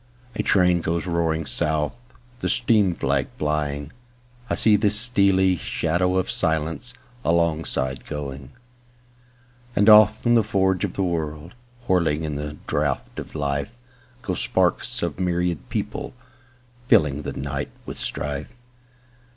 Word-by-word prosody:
A -, -, -2 dB
train 90 Hz, -3 st, +3 dB
goes 85 Hz, +2 st, -1 dB
roaring 85 Hz, -2 st, 0 dB
south, 75 Hz, +3 st, +1 dB, 0.5 s
The -, -, -2 dB
steam 105 Hz, -7 st, +2 dB
flag 70 Hz, -2 st, 0 dB
flying;I 120 Hz, -, -4 dB
see 110 Hz, -2 st, +4 dB
the 105 Hz, 0 st, +3 dB
stealthy 100 Hz, -4 st, +3 dB
shadow 85 Hz, +4 st, 0 dB
of 95 Hz, -, +1 dB
silenceAlongside 80 Hz, -, -1 dB
going. 70 Hz, -3 st, -6 dB, 1.3 s
And 100 Hz, -, +3 dB
off 105 Hz, 0 st, +7 dB
the 120 Hz, -1 st, +4 dB
forge 95 Hz, -3 st, +1 dB
of 100 Hz, -, -2 dB
the 100 Hz, -, -1 dB
world, 80 Hz, -2 st, -3 dB, 0.3 s
Whirling 80 Hz, -4 st, +1 dB
in 75 Hz, -1 st, -3 dB
the 75 Hz, +1 st, -5 dB
draught -, -, -2 dB
of -, -, -9 dB
life, 70 Hz, -2 st, -2 dB, 0.5 s
Go 90 Hz, -, -2 dB
sparks -, -, +1 dB
of -, -, -3 dB
myriad 90 Hz, -3 st, -1 dB
people, -, -, -4 dB, 0.7 s
fillingThe 75 Hz, -1 st, +2 dB
night 70 Hz, +1 st, -4 dB, 0.2 s
with -, -, -6 dB
strife. 70 Hz, +2 st, -4 dB
85 Hz, 120 wpm, -23 LUFS, 75-100 Hz, 1.3 s, off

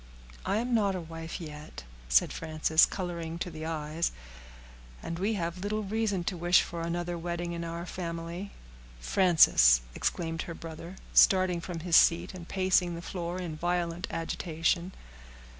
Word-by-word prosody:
"I 205 Hz, -, +2 dB
am 240 Hz, +2 st, -1 dB
not 200 Hz, -4 st, +2 dB
a -, -, -2 dB
wife 165 Hz, 0 st, -7 dB
yet," 150 Hz, -, -9 dB, 0.3 s
said -, -, +4 dB
Frances, 160 Hz, 0 st, +3 dB
coloring 170 Hz, -3 st, -4 dB
to 175 Hz, 0 st, -4 dB
the 155 Hz, 0 st, -6 dB
eyes; 160 Hz, +1 st, -2 dB, 0.9 s
"and 165 Hz, 0 st, -4 dB
we 210 Hz, +4 st, 0 dB
have 170 Hz, -1 st, -3 dB
little 210 Hz, +3 st, -2 dB
reason 205 Hz, -2 st, -1 dB
to 180 Hz, -, -2 dB
wish 175 Hz, +1 st, +4 dB
for 170 Hz, -1 st, -6 dB
another 175 Hz, +1 st, -3 dB
wedding 170 Hz, 0 st, -3 dB
in 170 Hz, 0 st, -4 dB
our 170 Hz, +1 st, -5 dB
family." 170 Hz, +2 st, -5 dB, 0.5 s
"Frances!" -, -, +5 dB
exclaimed 165 Hz, -, -2 dB
her 165 Hz, -, -5 dB
brother, 165 Hz, +3 st, -9 dB, 0.2 s
starting 185 Hz, -2 st, +5 dB
from 170 Hz, -1 st, -6 dB
his 170 Hz, 0 st, +1 dB
seat, 170 Hz, +3 st, +4 dB
and 175 Hz, -2 st, -9 dB
pacing 185 Hz, -2 st, +2 dB
the 170 Hz, -, -7 dB
floor 175 Hz, 0 st, -4 dB
in 170 Hz, -4 st, -4 dB
violent 175 Hz, +1 st, -1 dB
agitation. 165 Hz, +2 st, -1 dB
170 Hz, 155 wpm, -29 LUFS, 165-180 Hz, 0.9 s, Frances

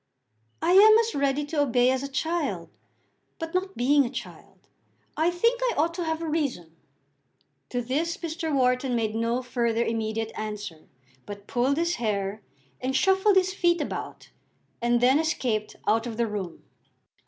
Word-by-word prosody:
"I 335 Hz, -, +3 dB
am 430 Hz, +4 st, +8 dB
as 455 Hz, 0 st, +1 dB
ready 280 Hz, +1 st, 0 dB
to 295 Hz, 0 st, -1 dB
obey 250 Hz, -2 st, +3 dB
as 260 Hz, 0 st, -1 dB
a 275 Hz, -, -4 dB
child; 325 Hz, +5 st, -2 dB, 0.7 s
but, 325 Hz, 0 st, -6 dB
not 375 Hz, +1 st, -2 dB
being 280 Hz, +4 st, +4 dB
a 240 Hz, -, -3 dB
child, -, -, -10 dB, 0.5 s
I 320 Hz, +2 st, +2 dB
think 465 Hz, +8 st, +1 dB
I -, -, +1 dB
ought 330 Hz, +3 st, +1 dB
to 350 Hz, 0 st, -3 dB
have 320 Hz, 0 st, -2 dB
a -, -, -3 dB
reason." 270 Hz, -, -2 dB, 0.9 s
To 245 Hz, 0 st, -2 dB
this 305 Hz, +8 st, -1 dB
Mr. 325 Hz, -1 st, -4 dB
Wharton 250 Hz, -2 st, +1 dB
made 220 Hz, -2 st, -1 dB
no 230 Hz, +3 st, -1 dB
further 235 Hz, -2 st, 0 dB
immediate 225 Hz, 0 st, -2 dB
answer, 210 Hz, -7 st, -6 dB, 0.4 s
but 200 Hz, -1 st, -8 dB
pulled 255 Hz, +5 st, 0 dB
his 340 Hz, +1 st, 0 dB
hair, 205 Hz, -2 st, -2 dB, 0.4 s
and 260 Hz, +1 st, -2 dB
shuffled 385 Hz, +6 st, +3 dB
his 375 Hz, 0 st, +3 dB
feet 345 Hz, -3 st, +2 dB
about, -, -, -6 dB, 0.5 s
and 240 Hz, 0 st, +2 dB
then 260 Hz, +4 st, +5 dB
escaped 245 Hz, -9 st, -1 dB
out 225 Hz, +3 st, +2 dB
of 225 Hz, -2 st, -6 dB
the 235 Hz, -, +1 dB
room. 200 Hz, -6 st, -5 dB
265 Hz, 165 wpm, -26 LUFS, 230-335 Hz, 0.9 s, am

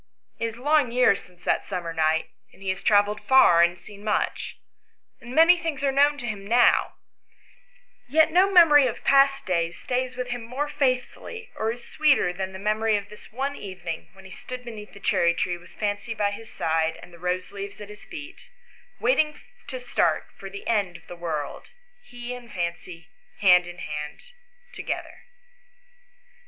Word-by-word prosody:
It 230 Hz, -, 0 dB
is 225 Hz, 0 st, -7 dB
long 290 Hz, -1 st, +2 dB
years 245 Hz, -5 st, +3 dB
since 180 Hz, 0 st, -22 dB
that -, -, +1 dB
summer 175 Hz, -4 st, -4 dB
night, 160 Hz, 0 st, +1 dB, 0.2 s
and 195 Hz, -, -16 dB
he 190 Hz, -, -2 dB
has 185 Hz, 0 st, -2 dB
travelled 205 Hz, 0 st, +3 dB
far, 260 Hz, -11 st, +6 dB
and 175 Hz, +1 st, +3 dB
seen 205 Hz, -1 st, -13 dB
much, 210 Hz, -1 st, -1 dB, 0.6 s
and 240 Hz, +2 st, -9 dB
many 335 Hz, +2 st, +7 dB
things 320 Hz, -5 st, -3 dB
are 275 Hz, -, +3 dB
known 290 Hz, +2 st, +4 dB
to 245 Hz, -, -6 dB
him 205 Hz, -3 st, -5 dB
now, 240 Hz, +2 st, +4 dB, 1.1 s
yet 315 Hz, +5 st, +4 dB
no 370 Hz, +4 st, +4 dB
memory 300 Hz, -7 st, +7 dB
of 235 Hz, -, -5 dB
past 275 Hz, 0 st, +4 dB
days 170 Hz, -2 st, -1 dB
stays 255 Hz, 0 st, -2 dB
with 250 Hz, -1 st, -3 dB
him 245 Hz, 0 st, -3 dB
more 255 Hz, +6 st, -3 dB
faith 255 Hz, -4 st, +1 dB
fully 465 Hz, +1 st, -11 dB
or 220 Hz, +1 st, -1 dB
is 240 Hz, +1 st, -10 dB
sweeter 275 Hz, -12 st, +3 dB
than 190 Hz, +1 st, -4 dB
the 190 Hz, -, -8 dB
memory 215 Hz, +2 st, +1 dB
of 205 Hz, 0 st, -7 dB
this 210 Hz, -, -14 dB
one 270 Hz, +5 st, -2 dB
even 190 Hz, -6 st, -9 dB
ing 165 Hz, -1 st, -4 dB
when 195 Hz, 0 st, -16 dB
he 190 Hz, -, -11 dB
stood 250 Hz, +3 st, -8 dB
beneath 215 Hz, -3 st, -9 dB
the 200 Hz, -, -12 dB
cherry 170 Hz, -3 st, +2 dB
tree 175 Hz, +1 st, -1 dB
with 175 Hz, +1 st, -15 dB
Fancy 210 Hz, +2 st, -3 dB
by 205 Hz, -1 st, +1 dB
his 225 Hz, +2 st, -9 dB
side 160 Hz, 0 st, 0 dB
and 180 Hz, -, -14 dB
the 170 Hz, -, -14 dB
rose 180 Hz, +1 st, -2 dB
leaves 200 Hz, 0 st, -7 dB
at 210 Hz, -1 st, -9 dB
his 210 Hz, 0 st, -12 dB
feet, 325 Hz, -1 st, -10 dB, 0.5 s
waiting 310 Hz, -11 st, +2 dB, 0.3 s
to -, -, -5 dB
start -, -, 0 dB
for 195 Hz, -, -9 dB
the 200 Hz, +1 st, -9 dB
end 200 Hz, -6 st, 0 dB
of -, -, -22 dB
the 175 Hz, -, -9 dB
world, 160 Hz, -4 st, -5 dB, 0.3 s
he 245 Hz, -, -8 dB
and 245 Hz, -2 st, -10 dB
Fancy 175 Hz, -1 st, -5 dB, 0.3 s
hand 180 Hz, -3 st, +5 dB
in 175 Hz, 0 st, -9 dB
hand 150 Hz, -3 st, -6 dB, 0.5 s
together. -, -, -6 dB
210 Hz, 185 wpm, -25 LUFS, 180-265 Hz, 1.1 s, many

